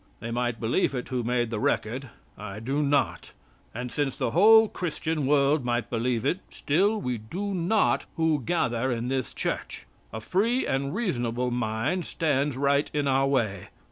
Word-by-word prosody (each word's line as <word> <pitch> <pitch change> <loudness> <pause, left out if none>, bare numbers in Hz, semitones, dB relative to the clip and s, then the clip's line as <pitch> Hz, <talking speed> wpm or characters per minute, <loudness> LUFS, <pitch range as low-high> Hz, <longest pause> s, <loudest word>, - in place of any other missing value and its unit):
They 115 +1 -5
might 120 -1 -1
believe 120 +4 +1
it 125 - -4
who 125 -1 -1
made 120 0 0
the 110 - -2
record. 125 +5 -1 0.3
I 105 0 -7
do 135 +6 -1
not. 145 -1 0 0.4
And 125 +1 -5
since 145 -3 -1
the 115 - -1
whole 220 +5 +7
Christian 160 -5 -2
world 145 0 +3
might 120 -2 -1
believe 115 0 0
it, 180 - +1
still 200 +9 +1
we 125 - -2
do 190 - -4
not 190 +4 +1
who 160 -3 +1
gather 130 -4 0
in 120 +1 -2
this 130 -3 -2
church. - - -4 0.3
A 110 - -5
free 215 - +1
and 140 +3 -1
reasonable 125 - -1
mind 120 +9 -1
stands 145 -4 0
right 140 +1 +2
in 145 -1 +1
our 135 0 +3
way. 110 -9 0
135 Hz, 170 wpm, -27 LUFS, 120-160 Hz, 0.4 s, whole